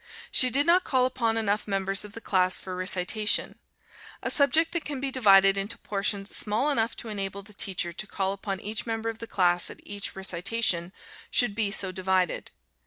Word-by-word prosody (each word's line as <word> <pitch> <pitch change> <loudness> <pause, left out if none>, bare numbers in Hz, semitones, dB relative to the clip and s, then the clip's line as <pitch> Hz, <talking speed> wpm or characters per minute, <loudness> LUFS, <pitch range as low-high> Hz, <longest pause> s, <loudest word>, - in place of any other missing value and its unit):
She 255 - +4
did 280 +4 +1
not 350 +2 +4
call 255 -2 +1
upon 230 -3 0
enough 215 -1 -1
members 195 -1 -1
of 210 -1 -10
the 230 - -9
class 185 -3 +1
for 185 -1 -7
recitation. 185 +3 +2 0.6
A - - 0
subject 315 +3 +3
that 340 -3 -2
can 285 -2 -5
be 270 0 -3
divided 195 -5 +5
into 210 +4 -4
portions 200 -1 -1
small 225 +8 +2
enough 230 -4 0
to - - -7
enable 200 -1 -4
the 210 +1 -15
teacher 190 -5 -1
to 210 +5 -5
call 195 -1 -2
upon 195 -1 -5
each 215 +3 -4
member 225 0 -2
of 225 -1 -7
the 230 - -7
class 180 -4 +1
at - - -10
each 200 0 -6
recitation, 190 -1 0 0.4
should 245 -5 +2
be 210 -1 0
so 195 -2 +2
divided. 185 -1 -1
205 Hz, 190 wpm, -26 LUFS, 190-230 Hz, 0.6 s, divided